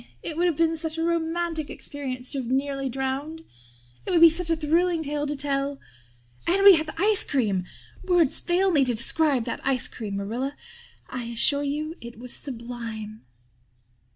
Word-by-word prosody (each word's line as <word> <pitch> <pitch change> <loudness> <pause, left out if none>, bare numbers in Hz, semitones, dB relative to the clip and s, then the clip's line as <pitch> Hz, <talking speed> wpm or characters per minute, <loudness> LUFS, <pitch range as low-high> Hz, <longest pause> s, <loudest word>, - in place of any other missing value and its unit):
It 315 - -4
would 350 +2 +2
have 330 -4 0
been 330 0 +2
such 320 0 -3
a 325 - -1
romantic 335 -1 -1
experience 260 -3 -6
to 275 - -3
have 250 - -5
been 260 +2 +2
nearly 275 -1 -2
drowned. 270 +5 -4 0.6
It - - -6
would 345 -3 +3
be 335 -1 +10
such 335 +1 -1
a 330 - +3
thrilling 330 +2 +1
tale 295 0 -2
to 295 - -2
tell. 275 0 -1 0.7
And 390 +3 +3
we 400 -1 +11
had 315 -2 +1
the 320 - -8
ice 415 +2 +6
cream. 205 -9 0 0.4
Words 350 -6 +3
fail 370 +2 +1
me 290 -5 +4
to 250 -2 +1
describe 265 +2 +1
that - - -4
ice 265 -2 +1
cream. 210 -4 -6
Marilla, 240 +8 -3 0.5
I 250 -2 -5
assure 235 +5 +2
you 300 +2 -3
it 235 -1 -10
was 245 +1 -7
sublime." 230 - -7
285 Hz, 180 wpm, -25 LUFS, 255-330 Hz, 0.7 s, we